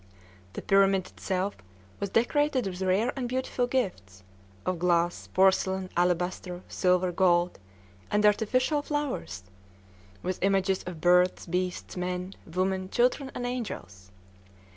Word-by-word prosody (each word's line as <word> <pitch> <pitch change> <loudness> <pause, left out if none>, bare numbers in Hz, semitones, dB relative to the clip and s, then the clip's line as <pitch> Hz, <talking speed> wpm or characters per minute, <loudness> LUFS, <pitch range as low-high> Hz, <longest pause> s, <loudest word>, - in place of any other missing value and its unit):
The - - -6
pyramid 195 -1 +4
itself 190 +1 -2 0.4
was 200 - -2
decorated 260 +3 +2
with 185 -1 -5
rare 190 +6 +2
and 250 -3 -3
beautiful 255 -1 -1
gifts, 100 - -3 0.4
of 185 -2 -1
glass, 175 0 +1
porcelain, 190 0 +2
alabaster, 180 +1 -1
silver, 180 -1 +2
gold, 175 - +2 0.5
and 210 0 +2
artificial 255 +8 +2
flowers, 285 - -3 0.8
with 185 0 -3
images 195 -1 +2
of 175 -3 -7
birds, 180 +1 +4
beasts, 180 +1 -3
men, 180 +1 -3
women, 185 +2 -1
children, 255 +4 +1
and 245 - -3
angels. 100 - -5
185 Hz, 120 wpm, -28 LUFS, 180-225 Hz, 0.8 s, pyramid